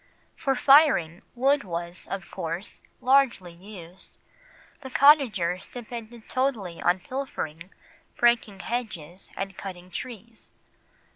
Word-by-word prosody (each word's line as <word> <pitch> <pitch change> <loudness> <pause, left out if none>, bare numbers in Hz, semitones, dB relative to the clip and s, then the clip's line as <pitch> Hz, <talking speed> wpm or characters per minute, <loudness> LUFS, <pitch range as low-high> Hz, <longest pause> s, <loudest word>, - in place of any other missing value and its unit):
For 270 -1 0
firing, 260 - +5
wood 275 +4 +3
was, 170 -1 -5
of 195 -1 -6
course, 170 +5 -5 0.2
largely 250 -9 +3
used, 180 -1 -12 0.6
the 265 - -8
cottagers 235 - +4
depended 235 -1 -9
totally 235 -10 -1
on 180 +1 +2
"pilfering, 180 - -5 0.5
breaking 230 -5 +2
hedges, 195 -8 -5
and 195 0 -4
cutting 185 -2 -8
trees." 230 -1 -8
210 Hz, 100 wpm, -26 LUFS, 175-255 Hz, 0.6 s, firing